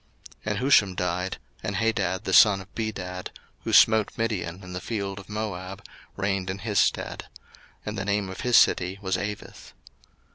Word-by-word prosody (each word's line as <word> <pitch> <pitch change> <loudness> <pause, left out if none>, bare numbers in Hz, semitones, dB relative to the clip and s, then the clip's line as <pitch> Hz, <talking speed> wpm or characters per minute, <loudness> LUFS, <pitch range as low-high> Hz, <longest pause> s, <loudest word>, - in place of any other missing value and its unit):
01:036:035 - - +1
And 105 - -1
Husham 110 -7 +4
died, 90 +1 -2 0.2
and 100 - -3
Hadad 100 -3 0
the - - -2
son 105 -3 +7
of 95 +1 -13
Bedad, 95 -5 -4 0.3
who - - -3
smote 110 -2 +6
Midian 100 -5 -2
in 90 0 -9
the 90 - -4
field 100 -3 -4
of 100 - -13
Moab, 100 -3 -5 0.3
reigned 95 -1 -1
in 95 - -3
his 105 -1 0
stead: - - 0 0.6
and - - -4
the 95 - -3
name 100 -1 0
of 95 - -7
his 125 -1 +4
city 90 +2 +3
was 95 -1 0
Avith. 105 0 -6
100 Hz, 175 wpm, -26 LUFS, 95-105 Hz, 0.6 s, son